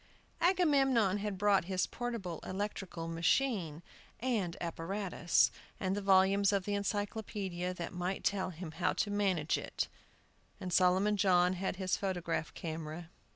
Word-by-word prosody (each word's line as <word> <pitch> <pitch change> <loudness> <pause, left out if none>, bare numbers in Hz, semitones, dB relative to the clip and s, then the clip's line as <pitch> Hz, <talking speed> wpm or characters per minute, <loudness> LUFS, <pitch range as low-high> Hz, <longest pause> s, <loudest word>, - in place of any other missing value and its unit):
Agamemnon 270 - +3
had 205 -1 -3
brought 200 -2 +3
his 185 0 0
Portable 230 -9 -4
Electrical 190 -3 -4
Machine 165 - 0 0.4
and 220 -9 -1
Apparatus, 175 +1 +1 0.3
and 190 0 0
the 205 - -2
volumes 195 +1 +4
of 195 -2 0
the 205 - -2
Encyclopædia 200 -3 -2
that 170 0 -5
might 180 +2 -3
tell 195 -2 0
him 170 -1 -7
how - - 0
to 205 - -1
manage 190 -7 +1
it, - - -3 0.7
and 185 -3 -4
Solomon 190 +4 +4
John 180 -2 +4
had 185 +1 -2
his 185 -1 0
photograph 175 -5 -2
camera. 160 +1 -6
190 Hz, 135 wpm, -33 LUFS, 175-205 Hz, 0.7 s, volumes